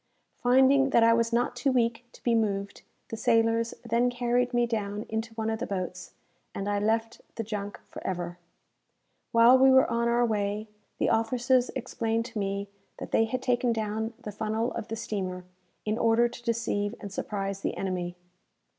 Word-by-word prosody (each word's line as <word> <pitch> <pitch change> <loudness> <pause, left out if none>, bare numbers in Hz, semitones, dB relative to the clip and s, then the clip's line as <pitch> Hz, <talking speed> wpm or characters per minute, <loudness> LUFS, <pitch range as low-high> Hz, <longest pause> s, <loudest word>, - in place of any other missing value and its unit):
Finding 265 +2 +4
that 235 -3 +4
I 230 0 +6
was 230 0 +1
not 240 +1 +1
too 275 - +1
weak 235 -1 +1
to - - -17
be 240 - +2
moved, 200 -3 -1 0.3
the - - -4
sailors 230 +1 +2
then 235 +2 +2
carried 245 0 0
me 240 -1 +2
down 210 -2 -3
into 225 +1 -3
one 220 0 -1
of 220 - -2
the 255 - -3
boats, 185 -2 -5 0.4
and 200 - -3
I 205 0 +1
left 225 +2 0
the 225 - -3
junk 205 -2 -5
for - - -10
ever. 175 -1 -4 0.9
While 235 +3 +7
we 265 +1 +7
were 265 0 +6
on 235 0 +1
our 240 +1 +3
way, 210 -1 -1 0.3
the - - +1
officers 245 +3 +2
explained 230 -3 -1
to 235 -3 -5
me 200 0 -2 0.3
that - - -7
they 225 - +4
had 250 +3 -3
taken 245 -1 +2
down 220 +1 -3
the 210 - -7
funnel 220 +3 -1
of 225 - -5
the 225 - -4
steamer, 185 -5 -4 0.4
in 215 +2 -1
order 230 +1 +4
to 240 0 -11
deceive 230 -2 -1
and 200 -3 -8
surprise 195 -1 -3
the - - -2
enemy. 180 -2 -3
225 Hz, 180 wpm, -28 LUFS, 205-240 Hz, 0.9 s, While